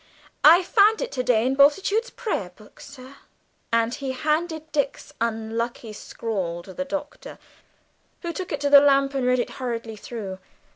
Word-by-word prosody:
I 335 +4 +8
found 425 +3 +4
it - - -4
to 255 - -2
day 240 -2 +2
in 260 - +1
Bultitude's 385 - +3
prayerbook, 215 - -6
sir." 275 -1 -13 0.5
And 230 +1 +1
he 270 -1 -4
handed 315 +3 -2
Dick's 285 0 -2
unlucky 230 0 -3
scrawl 190 -6 -4
to 190 - -11
the 275 - -4
Doctor, 295 - -6 0.9
who 340 -1 -3
took 370 +1 -6
it 290 - -3
to 285 - +1
the 285 -1 +10
lamp 275 -1 +3
and 265 -2 -1
read 250 0 +3
it 245 - -2
hurriedly 230 -3 -4
through. 200 -4 -7
270 Hz, 160 wpm, -24 LUFS, 230-305 Hz, 0.9 s, the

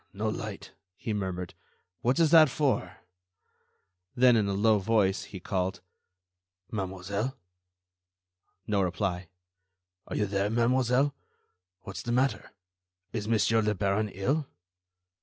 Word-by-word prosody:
no - - -2
light," - - -5 0.2
he 110 - -4
murmured. 95 -3 -3 0.5
"What 125 +4 +2
is 160 -2 +4
that 160 -3 +8
for?" 120 - 0 1.2
Then, 125 -1 +6
in 105 -3 +2
a 100 - 0
low 105 +2 +3
voice, 100 -2 +1
he 95 - -9
called: 90 -1 -2 0.9
"Mademoiselle?" 100 +4 -3 1.3
No 105 -2 +1
reply. 90 -1 -1 0.8
"Are - - -5
you 105 - +1
there, 100 0 0
mademoiselle? 125 +4 +2 0.7
What's 95 -1 -7
the 120 - -4
matter? 130 +3 +1 0.6
Is 105 -2 -3
Monsieur 115 0 +3
le 105 -1 0
Baron 100 +2 0
ill?" 135 +10 -1
105 Hz, 120 wpm, -29 LUFS, 95-120 Hz, 1.3 s, that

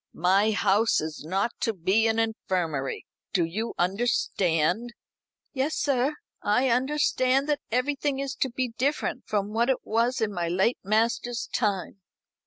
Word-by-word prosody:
My 190 +5 +3
house 210 +1 +3
is 155 -1 -5
not 190 +8 0
to 225 - 0
be 195 +5 +2
an 225 0 +1
infirmary. 180 -11 -1 0.3
Do 175 -3 +2
you 215 +8 -4
understand?" 190 0 0 0.6
"Yes, 280 +3 -1
sir; 275 +1 +1 0.3
I 250 +6 +2
understand 265 +1 +2
that 295 0 +1
everything 275 +3 0
is 275 0 -3
to 265 - 0
be 250 +1 -2
different 285 +4 -1
from 205 0 -1
what 235 +3 +2
it 265 - 0
was 235 +4 +1
in 220 -2 -1
my 175 -2 -2
late 190 +8 +1
master's 230 +3 0
time." 200 -3 -1
225 Hz, 145 wpm, -26 LUFS, 190-255 Hz, 0.6 s, My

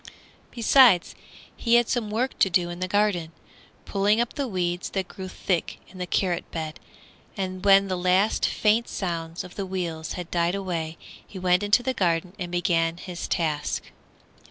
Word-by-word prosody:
Besides 235 -6 +5 0.4
he 235 -1 +2
had 240 -1 +4
some 235 -4 -1
work 240 +5 -2
to 190 - +4
do 175 -1 +1
in 175 - -7
the 185 - -1
garden, 185 -5 +1 0.5
pulling 205 +2 +2
up 240 0 0
the 280 -2 -2
weeds 180 -4 -2
that 190 -2 -2
grew 190 +1 -8
thick 185 -1 -2
in 185 - -13
the 180 - -3
carrot 175 -1 -1
bed, 160 -2 -5 0.6
and 185 -1 -4
when 195 0 +6
the 185 - -1
last 185 +4 +2
faint 220 +2 +2
sounds 165 -3 -4
of 180 - -11
the 200 - -4
wheels 170 -4 -4
had 180 -2 -7
died 170 +1 +1
away 170 -4 -3 0.3
he 195 - -10
went 180 0 +2
into 205 +4 +3
the 260 - 0
garden 175 -3 0
and 175 -2 -4
began 170 -2 +1
his 180 -1 -6
task. 155 -4 -2
185 Hz, 175 wpm, -25 LUFS, 175-205 Hz, 0.6 s, when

